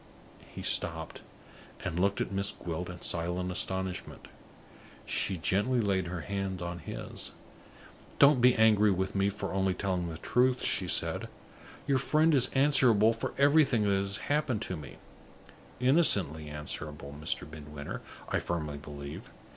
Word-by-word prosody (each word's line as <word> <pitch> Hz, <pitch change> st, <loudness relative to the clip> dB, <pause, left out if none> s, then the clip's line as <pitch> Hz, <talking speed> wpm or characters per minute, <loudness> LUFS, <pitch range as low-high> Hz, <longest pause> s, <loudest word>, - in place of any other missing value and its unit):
He -, -, -8 dB
stopped, 80 Hz, -1 st, +1 dB, 0.6 s
and 85 Hz, -, -3 dB
looked 100 Hz, +2 st, +1 dB
at -, -, -2 dB
Miss 100 Hz, 0 st, +1 dB
Gwilt 90 Hz, +1 st, -5 dB
in 90 Hz, -1 st, -9 dB
silent 90 Hz, +2 st, -1 dB
astonishment. 95 Hz, 0 st, -3 dB, 0.8 s
She 95 Hz, -, -1 dB
gently 105 Hz, +9 st, +1 dB
laid 95 Hz, -5 st, 0 dB
her 85 Hz, -1 st, -4 dB
hand 95 Hz, -1 st, -3 dB
on 85 Hz, 0 st, -5 dB
his. 75 Hz, -, -6 dB, 0.8 s
"Don't 140 Hz, -3 st, +6 dB
be 125 Hz, 0 st, +6 dB
angry 110 Hz, -2 st, +5 dB
with 95 Hz, 0 st, -1 dB
me 100 Hz, 0 st, +2 dB
for 100 Hz, -1 st, -5 dB
only 95 Hz, -1 st, +1 dB
telling 90 Hz, -3 st, -2 dB
the 80 Hz, -, -6 dB
truth," 125 Hz, +8 st, +1 dB
she -, -, +1 dB
said. -, -, 0 dB, 0.6 s
"Your 140 Hz, -2 st, +2 dB
friend 155 Hz, +4 st, +3 dB
is 130 Hz, -3 st, +4 dB
answerable 125 Hz, -6 st, +5 dB
for 115 Hz, -, -5 dB
everything 140 Hz, -5 st, +4 dB
that 100 Hz, -, +1 dB
has 100 Hz, +1 st, -1 dB
happened 145 Hz, -6 st, -1 dB
to 90 Hz, -, -4 dB
me 75 Hz, -4 st, -10 dB, 0.8 s
innocently 100 Hz, -, +3 dB
answerable, 75 Hz, -1 st, -5 dB
Mr. 75 Hz, -2 st, -2 dB
Midwinter, 75 Hz, -1 st, -8 dB, 0.3 s
I -, -, 0 dB
firmly 75 Hz, -4 st, -3 dB
believe. 70 Hz, 0 st, -9 dB
95 Hz, 145 wpm, -30 LUFS, 85-120 Hz, 0.8 s, Don't